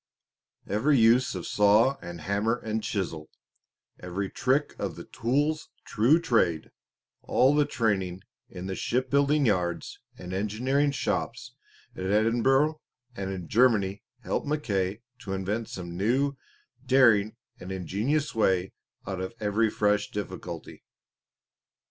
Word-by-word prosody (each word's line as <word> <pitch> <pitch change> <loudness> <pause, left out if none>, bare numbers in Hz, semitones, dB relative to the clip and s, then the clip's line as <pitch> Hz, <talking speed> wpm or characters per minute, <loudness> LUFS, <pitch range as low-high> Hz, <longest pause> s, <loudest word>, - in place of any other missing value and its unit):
Every 135 +8 +2
use 120 +2 +4
of 90 - -5
saw 105 +6 +4
and 85 -2 -8
hammer 100 +6 0
and 110 -1 -3
chisel, 95 -7 -3 0.7
every 95 +2 -4
"trick 135 +3 +1
of - - -3
the - - -8
tool's 145 +7 -1 0.2
true 125 +9 +3
trade," 100 - +1 0.5
all 130 +3 +3
the 150 -1 +3
training 95 -5 -1 0.3
in 90 0 -8
the 95 - -3
shipbuilding 140 +7 +1
yards 90 -6 -1 0.2
and 90 0 -7
engineering 125 +9 +1
shops 140 - -2 0.4
at 95 - -5
Edinburgh 120 +9 +2 0.3
and 95 -4 -4
in 90 -3 -6
Germany 105 -5 +3 0.2
helped - - -2
Mackay 105 -8 -1 0.2
to 105 -5 -5
invent 100 +4 -2
some 85 -2 -7
new, 130 +9 +1 0.5
daring 115 -5 +4 0.2
and 90 +1 -8
ingenious 105 - -1
way 95 -4 +1 0.3
out 95 -1 -4
of 95 +5 -5
every 110 +1 +1
fresh 105 0 +1
difficulty. 90 -5 -7
105 Hz, 125 wpm, -27 LUFS, 95-130 Hz, 0.7 s, use